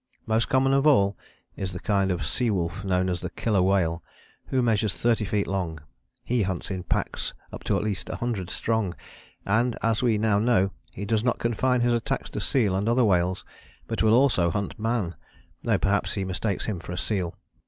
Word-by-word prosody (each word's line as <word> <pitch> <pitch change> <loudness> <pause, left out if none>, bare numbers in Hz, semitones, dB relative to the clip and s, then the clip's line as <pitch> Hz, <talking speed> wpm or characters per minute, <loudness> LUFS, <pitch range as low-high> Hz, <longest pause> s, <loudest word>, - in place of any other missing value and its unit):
Most 110 +1 +1
common 135 +1 +3
of 135 +2 +3
all 100 -9 +4 0.4
is 95 -2 -4
the 90 - -5
kind 100 -1 +1
of 90 -2 -1
sea 125 -2 0
wolf 90 0 -1
known 95 -1 +1
as 90 -1 -2
the - - -3
Killer 105 -5 0
Whale, 90 -3 +2 0.5
who 130 -1 +1
measures 110 -4 +1
30 115 -2 +2
feet 100 0 0
long. 90 -5 -2 0.4
He 120 -1 +1
hunts 95 -1 -2
in 95 -1 -3
packs - - -2 0.2
up - - -7
to - - +1
at - - -1
least 100 -3 -3
a - - -3
hundred 110 -7 -3
strong, 110 -3 -1 0.5
and 115 +4 +1
as 115 -1 +2
we 120 -4 +3
now 105 -1 +2
know, 105 -4 +3 0.2
he 100 - -4
does 110 +1 +1
not 125 -1 +1
confine 125 +2 +1
his 120 0 +3
attacks 115 -1 -2
to - - -3
seal 110 -8 +1
and 100 +4 0
other 120 +1 +4
whales, 90 -1 +1 0.4
but 115 - -2
will 110 0 +5
also 120 -10 +4
hunt 100 +4 -3
man, 110 -6 -1 0.5
though - - +2
perhaps - - +1
he 95 - -1
mistakes 95 +2 -2
him 105 -5 -2
for 85 - -8
a - - -5
seal. 95 -6 -2
105 Hz, 205 wpm, -26 LUFS, 95-115 Hz, 0.5 s, will